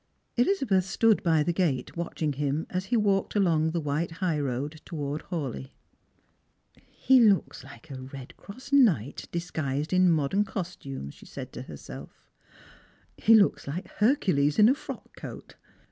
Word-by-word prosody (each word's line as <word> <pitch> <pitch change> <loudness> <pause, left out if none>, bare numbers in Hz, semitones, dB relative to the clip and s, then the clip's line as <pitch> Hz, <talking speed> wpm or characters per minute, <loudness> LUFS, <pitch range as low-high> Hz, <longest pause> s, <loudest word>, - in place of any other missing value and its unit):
Elizabeth 245 - +2
stood 220 +2 +3
by 160 -3 +3
the 175 - 0
gate 155 -9 -1
watching 165 -3 -2
him 145 +2 -1
as 185 +1 -2
he 235 +4 +1
walked 200 -2 +1
along 165 -5 +2
khe 170 - -2
white 155 +2 -1
high 165 -3 -1
road 145 +3 -3
towards 150 -2 -5
Hawleigh. 135 - -4 0.7
" - - -33 0.2
He 260 0 +8
looks 210 -5 +3
like 160 - -14
a 130 -1 -7
red 130 0 -10
cross 255 +7 -11
knight 180 - +3
disguised 155 -3 -3
in 185 0 +5
modern 165 +5 +2
cos 185 -3 -5
tume," 135 - -7
^he - - -16
said - - -8
to - - -6
herself; 65 +3 -11 0.8
"he 225 - +5
looks 205 -8 +3
like 160 +7 -5
Hercules 185 - +2
in 215 +1 +7
a - - +5
frock 290 - -9
coat. - - -9
170 Hz, 160 wpm, -27 LUFS, 145-200 Hz, 0.8 s, He